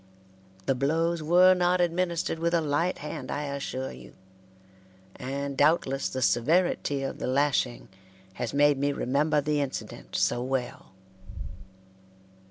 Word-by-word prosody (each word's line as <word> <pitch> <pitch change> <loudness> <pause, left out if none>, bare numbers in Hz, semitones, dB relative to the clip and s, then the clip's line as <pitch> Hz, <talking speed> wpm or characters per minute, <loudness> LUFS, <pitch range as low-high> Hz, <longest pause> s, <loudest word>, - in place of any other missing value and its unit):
The - - +2
blows 160 +6 0
were 180 +4 +6
not 180 0 +2
administered 175 -1 0
with 170 +1 +1
a - - +4
light 155 +4 0
hand, 150 -3 -6
I 145 - -2
assure 140 -2 -4
you, 60 0 -13 1.0
and 140 +1 -4
doubtless 145 -2 +2
the 130 -1 -3
severity 145 +1 +1
of 135 - -4
the - - -3
lashing 130 -2 0 0.5
has - - -2
made 145 -1 +3
me 140 +1 +1
remember 145 +4 +1
the 150 0 0
incident 140 -2 -6
so 120 - +1
well. 125 -5 -4
145 Hz, 130 wpm, -27 LUFS, 135-165 Hz, 1.0 s, were